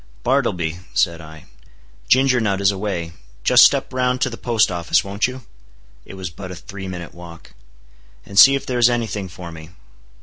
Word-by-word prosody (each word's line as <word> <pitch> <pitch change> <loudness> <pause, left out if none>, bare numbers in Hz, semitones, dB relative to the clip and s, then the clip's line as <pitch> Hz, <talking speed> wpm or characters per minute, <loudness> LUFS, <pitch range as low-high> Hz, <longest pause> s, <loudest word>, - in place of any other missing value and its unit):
"Bartleby," 85 -1 0 0.2
said 85 -2 +1
I, 80 -1 -13 0.6
"Ginger 130 -1 +3
Nut 100 -4 0
is 100 0 +3
away; 95 -4 -4 0.3
just - - +6
step - - +3
round 125 0 0
to 135 - +1
the - - -6
Post 115 -4 +1
Office, 85 +2 +1
won't 100 +2 -1
you? 130 0 -9 0.6
(it - - -11
was 95 -3 -6
but 95 +3 -9
a 90 - -7
three 95 +2 -9
minute 90 -2 -7
walk,) 85 -1 -13 0.7
and 100 -1 0
see 135 0 +9
if 140 - -4
there 125 -1 -2
is 120 0 +5
any 120 -1 0
thing 105 -3 -5
for 90 -1 -10
me." 80 -1 -11
95 Hz, 190 wpm, -20 LUFS, 85-120 Hz, 0.7 s, see